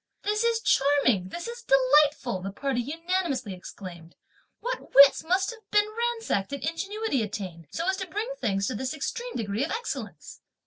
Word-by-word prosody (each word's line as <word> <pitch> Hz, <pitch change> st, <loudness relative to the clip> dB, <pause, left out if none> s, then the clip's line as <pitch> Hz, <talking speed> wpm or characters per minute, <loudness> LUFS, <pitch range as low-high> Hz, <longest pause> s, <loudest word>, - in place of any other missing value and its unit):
"This 425 Hz, +2 st, +1 dB
is 465 Hz, -1 st, +2 dB
charming! 270 Hz, -, +3 dB
this 345 Hz, -, -6 dB
is 475 Hz, 0 st, -7 dB
delightful!" 270 Hz, -, +3 dB
the 195 Hz, +1 st, -4 dB
party 260 Hz, +4 st, -1 dB
unanimously 315 Hz, -, -2 dB
exclaimed, 175 Hz, -2 st, -10 dB, 0.4 s
"what -, -, -5 dB
wits 280 Hz, +2 st, +8 dB
must 370 Hz, +6 st, +1 dB
have 440 Hz, -3 st, -15 dB
been 415 Hz, 0 st, +4 dB
ransacked, 460 Hz, -, -1 dB
and 280 Hz, -, -4 dB
ingenuity 390 Hz, -, -1 dB
attained, 185 Hz, -6 st, -5 dB
so 335 Hz, -, -3 dB
as 380 Hz, 0 st, +1 dB
to 375 Hz, -1 st, -4 dB
bring 435 Hz, +7 st, -3 dB
things 195 Hz, -2 st, 0 dB
to 255 Hz, -, -1 dB
this 260 Hz, +6 st, -3 dB
extreme 475 Hz, -, -4 dB
degree 215 Hz, +2 st, -1 dB
of 305 Hz, -, -2 dB
excellence!" 470 Hz, +1 st, -5 dB
290 Hz, 170 wpm, -27 LUFS, -, 0.4 s, wits